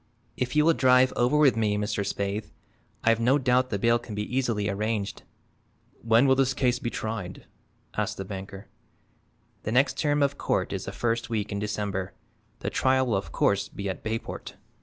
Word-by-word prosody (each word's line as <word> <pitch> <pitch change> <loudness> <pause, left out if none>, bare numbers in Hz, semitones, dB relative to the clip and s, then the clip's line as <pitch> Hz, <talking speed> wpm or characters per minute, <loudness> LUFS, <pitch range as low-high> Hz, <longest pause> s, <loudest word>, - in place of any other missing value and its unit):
If 125 +1 -2
you 150 0 +4
will 165 - +5
drive 130 -2 +4
over 125 +5 +2
with 140 -6 +5
me, 105 -2 +1
Mr. 105 0 -1
Spaythe, 100 +1 -3 0.5
I've 115 0 +3
no 125 +5 +4
doubt 125 -1 +2
the 100 - -1
bail 115 +3 +3
can 115 -3 -8
be 105 +4 -4
easily 115 -6 0
arranged." 105 0 -2 0.8
"When 115 +3 +4
will 130 -1 +5
his 135 -1 +2
case 125 -2 +1
be 120 - -2
tried?" 110 -6 -5 0.5
asked - - -2
the 95 - -5
banker. 95 0 -8 0.9
"The 110 - -4
next 130 +3 +2
term 145 -1 +2
of 140 0 0
court - - 0
is - - -4
the - - -5
first 115 0 -1
week 105 -2 -2
in 100 - -2
December. 100 -2 -3 0.5
The - - -2
trial 130 0 +2
will 115 -5 0
of 95 - -3
course 100 0 +1
be 100 - -5
at 95 - -5
Bayport." 110 +1 -5
115 Hz, 185 wpm, -27 LUFS, 105-130 Hz, 0.9 s, will